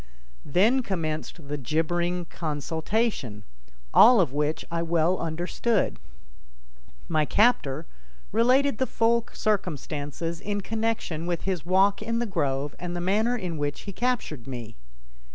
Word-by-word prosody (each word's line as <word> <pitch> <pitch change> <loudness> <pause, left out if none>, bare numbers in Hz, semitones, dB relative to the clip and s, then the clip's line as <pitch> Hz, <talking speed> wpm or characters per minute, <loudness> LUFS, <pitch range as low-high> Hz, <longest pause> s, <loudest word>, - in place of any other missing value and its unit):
Then 220 - +4
commenced 160 - -4
the 145 0 -3
jibbering 175 +6 0
consultation, 160 - -2 0.5
all 240 0 +8
of 160 -8 +2
which 150 +2 -1
I 170 0 0
well 170 +2 +2
understood. 175 +7 -1 1.1
My 155 -2 +2
captor 160 - +2 0.5
related 250 +4 +3
the 260 - +1
full 230 0 +2
circumstances 165 -4 -2
in 205 0 -2
connection 220 -6 -2
with 175 -2 -2
his 185 -4 -2
walk 195 +3 +3
in 230 +2 -1
the 240 - 0
grove 145 - -1
and 175 0 -4
the - - -2
manner 215 +7 +1
in 175 -7 -4
which 145 0 -2
he 200 - -7
captured 220 - -2
me. 120 -4 -7
175 Hz, 130 wpm, -26 LUFS, 155-215 Hz, 1.1 s, all